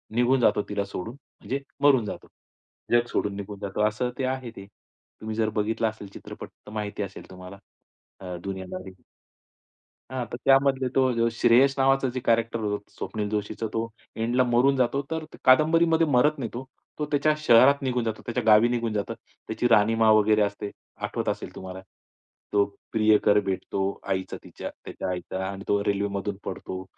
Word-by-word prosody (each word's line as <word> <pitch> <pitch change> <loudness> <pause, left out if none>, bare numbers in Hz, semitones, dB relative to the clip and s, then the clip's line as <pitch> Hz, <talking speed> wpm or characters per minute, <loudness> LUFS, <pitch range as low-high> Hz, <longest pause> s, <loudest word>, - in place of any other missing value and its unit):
निघून 125 +2 +3
जातो 105 - +3
तिला 100 -1 -1
सोडून. 100 +3 -6 0.3
म्हणजे 140 +2 -3 0.2
मरून 130 -6 +5
जातो - - -7 0.6
जग 120 0 +4
सोडून 100 -1 -1
निघून 100 0 -7
जातो, 100 +1 -3
असं 125 +4 -2
ते - - 0
आहे 130 -2 -3
ते. 100 0 -10 0.5
तुम्ही 110 0 -4
जर 110 -1 +1
बघितला 110 +1 0
असेल 110 -2 -10
चित्रपट - - -9 0.2
तर - - -9
माहिती 105 -1 -3
असेल 100 - -9
तुम्हाला 90 +1 -10 0.6
अ, 90 -2 -6
दुनियादारी. 95 -1 -7 1.1
हां 130 -2 -2
तर 120 - -4
त्यामध्ये 135 -1 +4
तो 120 -3 +3
श्रेयस 120 +4 +4
नावाचं 135 0 +3
जे 130 - -2
कॅरेक्टर 115 0 +1 0.3
स्वप्नील 105 -2 -4
जोशीचं 105 +1 -3
तो 115 0 -1 0.3
एंडला 120 +3 +1
मरून 125 +3 +3
जातो 130 +2 +1
तर 160 -1 -2 0.2
कादंबरीमध्ये 160 +4 +4
मरत 145 +3 +3
नाही 120 -4 -3
तो. 120 +2 -5 0.4
तो 150 - 0
त्याच्या 150 +1 +3
शहरात 140 0 +5
निघून 125 -2 -1
जातो. 110 -1 -3
त्याच्या 120 0 -2
गावी 110 +2 +6
निघून 115 -2 -1
जातो. 100 -1 -2
त्याची 110 +2 -4
राहणीमा 115 0 +4
वगैरे 110 0 +4
असते. 100 0 -1 0.3
आठवत - - -3
असेल - - -4
तुम्हाला 95 0 -8 0.7
तो 100 -1 +4 0.3
प्रियकर 110 -1 +4
भेटतो 95 0 -2 0.3
आईचा 95 0 -2
तिच्या - - -7 0.2
त्याचा 95 - -5
आईचा 95 +1 -4
आणि 100 0 -7
तो 100 0 +1
रेल्वेमधून 100 0 -1
पडतो. 95 0 -5
115 Hz, 160 wpm, -26 LUFS, 100-130 Hz, 1.1 s, गावी